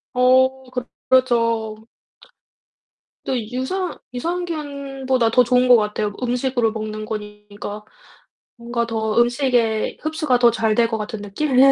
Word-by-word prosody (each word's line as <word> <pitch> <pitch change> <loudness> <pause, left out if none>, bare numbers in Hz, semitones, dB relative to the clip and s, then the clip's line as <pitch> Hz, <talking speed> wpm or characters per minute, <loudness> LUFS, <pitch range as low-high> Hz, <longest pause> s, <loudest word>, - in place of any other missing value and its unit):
어 260 +1 +3
그렇 250 0 -4 0.2
그렇죠. 230 -4 +1 1.4
또 260 - 0
유산 355 +9 -3 0.2
유산균보다 280 -5 -2
더 250 +2 +5
좋은 250 +1 +3
것 245 - +9
같아요. 210 -1 -1
음식으로 245 -1 0
먹는 215 -1 -5
거니까 210 -1 -7 0.7
뭔가 235 0 -2
더 220 -1 0
음식에 240 -3 +1
흡수가 310 -4 +1
더 240 -1 +6
잘 220 -1 +1
될 235 0 +3
것 225 -1 -2
같은 210 0 -5
느낌? 250 +7 -2
240 Hz, 240 characters per minute, -21 LUFS, 220-260 Hz, 1.4 s, 것